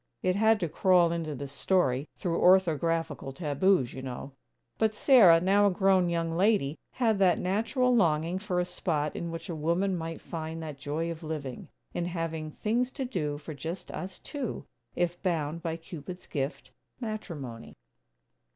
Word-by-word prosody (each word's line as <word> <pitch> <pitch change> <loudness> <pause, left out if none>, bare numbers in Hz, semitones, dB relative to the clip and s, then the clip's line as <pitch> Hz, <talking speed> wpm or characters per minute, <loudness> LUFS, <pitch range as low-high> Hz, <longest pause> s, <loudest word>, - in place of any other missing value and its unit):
It 185 0 +2
had 220 +1 +4
to 170 - +1
crawl 175 +1 +4
into 165 -3 -3
this 140 0 -6
story, 140 -3 +1
through 170 -4 -1
orthographical 165 -5 +2
taboos, 150 -2 +2
you 130 - -6
know.) 130 +1 -6 0.5
But 220 -1 +2
Sarah, 210 - +7
now 200 +3 +4
a - - +5
grown 190 -1 +3
young 165 -1 -1
lady, 180 -6 +2
had 225 -5 +1
that 185 -3 +4
natural 230 +7 +1
longing 170 -3 +2
for 190 -3 -1
a 180 - +1
spot 160 -4 -2
in 170 - -3
which 165 0 -6
a 175 - -4
woman 170 +5 +1
might 165 -1 -4
find 160 0 -5
that 150 -3 -7
joy 155 +5 -2
of 165 0 -7
living, 150 -5 -5 0.3
in 175 - -1
having 165 -3 -3
"things 235 +9 0
to 270 - -3
do 150 - -2
for 155 +2 -8
just 165 +5 -6
us 185 +1 -6
two" 265 - -5 0.3
if 175 0 -1
bound 170 -3 -1
by 165 -1 -3
Cupid's 170 +1 -9
gift 140 +1 -4 0.3
matrimony. 165 - -6
170 Hz, 165 wpm, -29 LUFS, 155-190 Hz, 0.5 s, Sarah